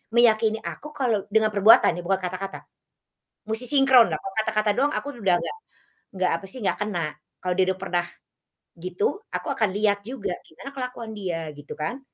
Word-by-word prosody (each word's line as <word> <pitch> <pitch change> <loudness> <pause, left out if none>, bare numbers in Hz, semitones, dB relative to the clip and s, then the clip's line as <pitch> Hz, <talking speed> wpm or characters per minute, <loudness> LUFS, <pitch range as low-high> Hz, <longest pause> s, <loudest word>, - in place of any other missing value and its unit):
meyakini 220 -2 +4
aku, 300 - -6
kalau 230 -8 0
dengan 220 -1 +4
perbuatan 205 +2 +7
ya, - - -4
bukan 190 +1 +1
kata-kata. 185 +2 -4 0.9
Musti 220 +3 +1
sinkron, 270 -4 +7
lah 155 - -1
kalau 195 +3 -7
kata-kata 215 -1 +1
doang 280 +3 +2
aku - - -3
udah 185 -3 +4
nggak - - -5 0.6
nggak 185 -1 +2
apa 165 - -11
sih, 255 - -4
nggak - - +1
kena 205 -5 -2 0.4
kalau 180 -1 -1
dia 190 - +4
udah 190 - -11
pernah 175 -2 0 0.7
gitu, 180 +3 -3 0.3
aku - - -3
akan 215 -3 +2
liat 205 -1 +2
juga 215 -8 -3
gimana 215 - -10
kelakuan 250 -3 -5
dia 165 -5 -3
gitu 145 0 -10
kan? 165 - -3
210 Hz, 180 wpm, -25 LUFS, 185-230 Hz, 0.9 s, perbuatan